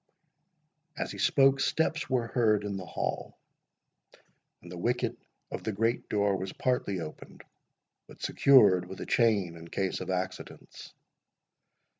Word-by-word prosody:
As - - -3
he - - -8
spoke, 135 -1 +4
steps 160 +2 0
were 125 -3 +1
heard 110 -4 +2
in 100 -1 -3
the 95 -2 -6
hall, - - -4 1.3
and 85 - -11
the 90 - -7
wicket 120 +6 -1 0.4
of - - -5
the 110 - -2
great 115 +4 -1
door 100 -1 +1
was 95 0 -5
partly 125 -7 -1
opened, 80 -2 -9 0.6
but - - -15
secured 100 -10 +5
with 95 - -8
a - - -5
chain 105 -8 +2
in 85 0 -11
case 95 +2 -2
of - - -6
accidents. 95 0 -6
105 Hz, 140 wpm, -29 LUFS, 95-125 Hz, 1.3 s, secured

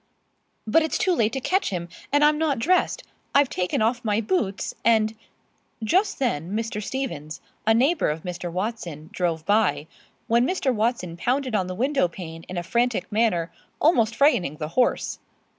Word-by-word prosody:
"But 230 +9 +4
it's 320 - 0
too 370 - +2
late 225 -9 +2
to 265 - -1
catch 370 +9 +1
him, 175 -3 -4 0.2
and 290 +1 +5
I'm 300 0 +3
not 305 -4 +1
dressed. 355 +11 +1 0.3
I've 280 -2 +4
taken 180 +4 0
off 240 +2 0
my 210 -1 +1
boots, 210 - -1
and 220 -1 +3 0.4
" - - -18
Just 390 +2 +2
then 195 - -1
Mr. 220 -1 -2
Stevens, 200 - -4 0.3
a 220 - +5
neighbor 275 - +2
of 155 +1 -3
Mr. 180 -1 -5
Watson, 175 -5 -4
drove 165 -3 -1
by, 200 -9 +2 0.4
when 235 +2 +3
Mr. 300 -8 0
Watson 215 -7 -1
pounded 255 +5 -1
on 190 -4 +1
the 185 - -5
window 265 -1 +2
pane 165 -2 -9
in 180 - -5
a 175 - -2
frantic 235 +5 0
manner, 205 -6 +1 0.3
almost 230 -8 +3
frightening 225 - +3
the 150 0 -4
horse. 250 +8 0
220 Hz, 175 wpm, -24 LUFS, 180-265 Hz, 0.4 s, and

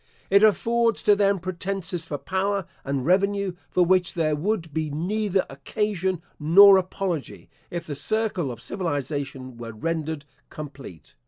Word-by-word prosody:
It 200 +1 +6
affords 230 +2 +3
to 205 - +5
them 200 -1 +3
pretences 185 -1 -3
for 145 - -3
power, 195 +3 -1 0.2
and 135 -2 -2
revenue, 200 +2 +2 0.2
for 180 - +3
which 185 0 +2
there 155 -3 +1
would 165 -1 -2
be 155 0 -1
neither 190 +5 0
occasion 185 +5 -2 0.2
nor 190 +6 +8
apology, 185 -4 -4 0.2
if 175 -1 -5
the 150 - -5
circle 190 - -1
of 120 - -8
civilisation 140 -4 -4
were 115 -1 -7
rendered 160 +3 -3 0.2
complete. 135 - -10
175 Hz, 140 wpm, -25 LUFS, 145-200 Hz, 0.2 s, nor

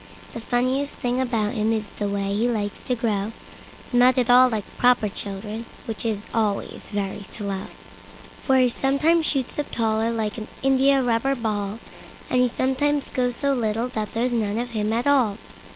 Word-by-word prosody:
The - - -5
funniest 255 +4 0
thing 250 +1 -1
about 225 -5 0
him 220 -1 +1
is 220 -1 0 0.2
the 205 - 0
way 200 0 -1
he 225 +4 +2
likes 205 -3 -2
to 250 - 0
grow—Not 230 +3 -1
at 245 -1 +3
all 255 +1 +7
like 220 -3 -2 0.2
proper 245 -3 +4
children, 210 +3 -6 0.2
which 225 0 -5
is 210 -2 -2
always 215 -3 -1
very 200 -1 -3
slow; 200 -1 -5 0.8
For 265 -2 +3
he 255 -1 +5
sometimes 305 +6 +2
shoots 270 0 -1
up 290 - -2
taller 220 0 0
like 225 -1 -2
an 215 - -7 0.2
India 270 0 +4
rubber 245 +3 +1
ball, 210 -3 -2 0.5
And 250 - +4
he 250 - +4
sometimes 270 +4 0
gets 245 -2 0
so 280 -1 +1
little 230 -1 -1
that 215 -3 -4
there's 240 +2 +1
none 215 -2 0
of 240 +1 -3
him 215 -1 -1
at 235 +2 0
all. 255 -8 +3
235 Hz, 175 wpm, -24 LUFS, 215-255 Hz, 0.8 s, all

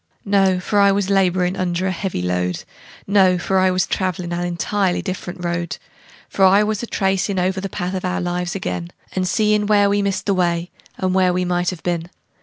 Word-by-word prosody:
No 195 -2 +3
for 205 +3 0
I 200 0 +6
was 200 0 0
laborin' 185 -1 +2
under 185 -1 -1
a 190 - +1
heavy 185 - -3
load; 90 0 -1 0.4
No 190 -2 +4
for 190 +2 0
I 185 0 +4
was 185 0 +1
travelin' 180 -2 -2
an 175 +1 -2
entirely 180 +2 -1
different 180 -2 -5
road; 170 -3 -2 0.5
For 195 - 0
I 195 +2 +6
was 215 -1 -1
a 240 - -5
tracin' 195 -1 0
over 185 +1 0
the 195 - -4
path 180 -1 -4
of 185 - -3
our 185 +1 -1
lives 175 0 -2
ag'in, 90 - -4 0.2
And 185 -1 -1
seein' 210 +1 +2
where 205 -1 +4
we 205 0 +2
missed 200 -1 -1
the 200 - +2
way, 175 -1 0 0.3
and 185 -1 -1
where 185 -1 +3
we 180 0 0
might 175 0 0
have 180 -3 -7
been. 175 -1 -2
185 Hz, 210 wpm, -20 LUFS, 175-195 Hz, 0.5 s, I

